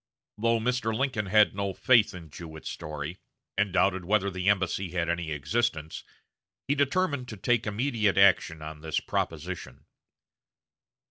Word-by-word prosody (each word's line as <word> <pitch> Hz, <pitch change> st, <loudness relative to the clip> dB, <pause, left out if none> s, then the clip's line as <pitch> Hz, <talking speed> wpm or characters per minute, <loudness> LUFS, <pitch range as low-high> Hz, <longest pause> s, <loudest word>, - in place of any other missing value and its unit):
Though 115 Hz, +1 st, +2 dB
Mr. 110 Hz, -1 st, 0 dB
Lincoln 125 Hz, -6 st, -1 dB
had 105 Hz, +2 st, +5 dB
no 100 Hz, -1 st, -2 dB
faith 115 Hz, -7 st, +4 dB
in 85 Hz, -4 st, -11 dB
Jewett's 80 Hz, 0 st, -8 dB
story, 75 Hz, +3 st, -6 dB, 0.4 s
and 100 Hz, -1 st, +1 dB
doubted 95 Hz, 0 st, +2 dB
whether 100 Hz, +1 st, +1 dB
the 95 Hz, +1 st, 0 dB
embassy 95 Hz, -1 st, +1 dB
had 85 Hz, -1 st, -1 dB
any 85 Hz, -1 st, -1 dB
existence, 80 Hz, +2 st, -2 dB, 0.6 s
he 140 Hz, -, +3 dB
determined 145 Hz, -1 st, 0 dB
to 110 Hz, -, -8 dB
take 120 Hz, +3 st, +1 dB
immediate 110 Hz, -2 st, 0 dB
action 90 Hz, -5 st, +4 dB
on 75 Hz, 0 st, -8 dB
this 80 Hz, -2 st, -1 dB
proposition. -, -, -4 dB
100 Hz, 140 wpm, -28 LUFS, 85-115 Hz, 0.6 s, had